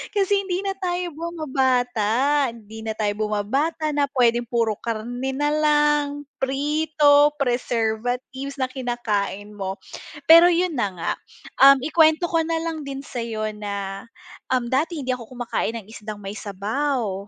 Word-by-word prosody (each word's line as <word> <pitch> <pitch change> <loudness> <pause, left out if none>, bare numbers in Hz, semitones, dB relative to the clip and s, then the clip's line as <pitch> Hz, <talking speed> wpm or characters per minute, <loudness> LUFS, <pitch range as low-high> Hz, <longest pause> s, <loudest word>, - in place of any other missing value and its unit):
Kasi 400 0 +2
hindi 370 +1 -2
na 390 -1 -1
tayo 355 -1 -2
bumabata 265 -4 +1
hindi 220 -1 -11
na 220 -1 -3
tayo 210 -2 0
bumabata 285 +10 -1
na 285 -1 +1
puwedeng 240 -3 +2
puro 230 -3 0
karne 240 +3 -3
na 290 +1 +1
lang, 295 -1 +2 0.2
prito, 290 +1 +3
preservatives 245 +2 -2
na 260 -1 -1
kinakain 210 -5 -3
mo. 195 0 -4 0.5
Pero 335 +2 +10
'yun 350 -1 +1
na 205 -4 +1
nga, 170 - -2 0.5
um, 275 0 +9
ikuwento 315 +2 +4
ko 330 - +3
na 330 0 -1
lang 325 -2 -3
din 275 0 -5
sa'yo 225 -5 -4
na, 200 0 -5 0.5
um, 250 -2 +1
dati 320 +5 0
hindi 255 - -2
ako 235 -3 -8
kumakain 240 -1 -2
ng 200 - -14
isdang 215 -1 -7
may 195 +1 -6
sabaw. 210 0 -2
260 Hz, 140 wpm, -23 LUFS, 220-295 Hz, 0.5 s, Pero